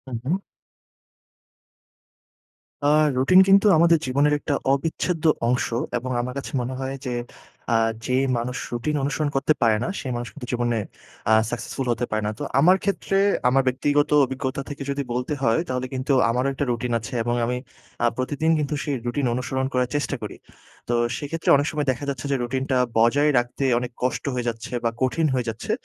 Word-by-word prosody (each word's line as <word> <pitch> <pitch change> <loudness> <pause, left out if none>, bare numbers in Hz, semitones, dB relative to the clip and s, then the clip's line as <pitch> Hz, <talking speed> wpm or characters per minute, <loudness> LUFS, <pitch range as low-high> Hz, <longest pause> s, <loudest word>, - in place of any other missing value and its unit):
উহুম। 135 +11 -1 2.5
আ - - +4 0.3
রুটিন 160 +9 +6
কিন্তু 195 +2 +6
আমাদের 170 0 +5
জীবনের 140 +3 +2
একটা 145 - -2 0.2
অবিচ্ছেদ্য 160 +3 -2 0.2
অংশ 125 +1 +1 0.3
এবং 130 +2 -4
আমার 125 +1 -4
কাছে 135 - -5
মনে 125 +2 -4
হয় 135 +1 -3
যে 125 - -2 0.6
আ - - +4 0.3
যে 125 - 0 0.2
মানুষ 125 +2 -3 0.2
রুটিন 135 +6 -1
অনুসরণ 145 +2 0
করতে 135 +3 +3
পারে 115 -2 +4
না, - - -2
সে - - -9
মানুষ 120 0 -4
কিন্তু 125 -4 -9
জীবনে 120 -1 0 0.5
আ - - +7 0.2
successful 125 +2 -4
হতে 120 +1 -1
পারে 110 0 0
না। - - -1
তো - - -3 0.2
আমার 180 +6 +6
ক্ষেত্রে, 195 -1 -1 0.3
আমার 135 +2 +4
ব্যক্তিগত 145 +3 +2 0.2
অভিজ্ঞতা 130 +2 -3
থেকে 140 -1 -6
যদি 140 0 -1
বলতে 125 +4 -2
হয় 115 +4 +3
তাহলে 130 0 -2
কিন্তু 130 +2 -2 0.2
আমারও 125 +3 +1
একটা 140 +2 -2
রুটিন 120 +1 -2
আছে 115 +4 -8
এবং 120 +1 0
আমি 125 +1 -1 0.5
আ - - +5
প্রতিদিন 145 +5 0
কিন্তু 150 0 -2
সেই 145 - -1
রুটিন 125 +3 -1
অনুসরণ 130 +2 -2
করার 125 -1 +1
চেষ্টা 145 -4 -1
করি। - - -6 0.5
তো - - +1 0.2
সেইক্ষেত্রে 155 +4 -3
অনেক 145 +1 +1
সময় 150 -2 -2
দেখা 130 +2 -6
যাচ্ছে 135 -1 -4
যে - - +3
রুটিনটা 130 +2 -1 0.2
বজায় 135 +7 +4
রাখতে 120 +3 -4 0.2
অনেক 125 0 -5
কষ্ট 125 - 0
হয়ে 125 -1 -2
যাচ্ছে 115 -1 -7
বা 115 - +2
কঠিন 130 +5 +1
হয়ে 125 -2 0
যাচ্ছে। 110 0 -4
130 Hz, 180 wpm, -23 LUFS, 120-145 Hz, 2.5 s, আ